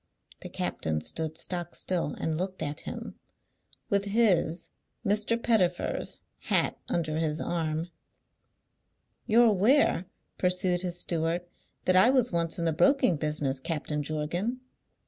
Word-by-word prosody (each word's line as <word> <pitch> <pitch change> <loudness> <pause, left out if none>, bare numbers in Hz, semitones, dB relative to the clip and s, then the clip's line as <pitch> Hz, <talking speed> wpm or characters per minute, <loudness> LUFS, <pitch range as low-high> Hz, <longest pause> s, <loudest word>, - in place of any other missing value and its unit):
The - - -7
captain 80 -1 -2
stood 160 - -4
stock 175 -1 -3
still 175 -5 -1
and 160 - -2
looked 185 +3 -3
at 145 0 -3
him, - - -8 0.7
with 200 -2 +1
his 195 -6 +2 0.3
(Mr. 210 +3 +1
Pettifer's) 190 -7 0 0.2
hat - - 0
under 155 -2 -1
his 155 -1 -1
arm. 160 -1 -2 1.4
"You're 235 +1 +6
aware," 210 - +3 0.3
pursued 180 -1 +2
his 175 -1 -3
steward, 170 +1 -1 0.4
"that 185 - +3
I 190 +6 +7
was 255 -2 +3
once 170 -1 0
in 170 - -1
the 165 - +2
broking 260 - +4
business, 150 -3 0
Captain 150 0 -2
Jorgan?" 170 - -2
175 Hz, 125 wpm, -28 LUFS, 155-200 Hz, 1.4 s, I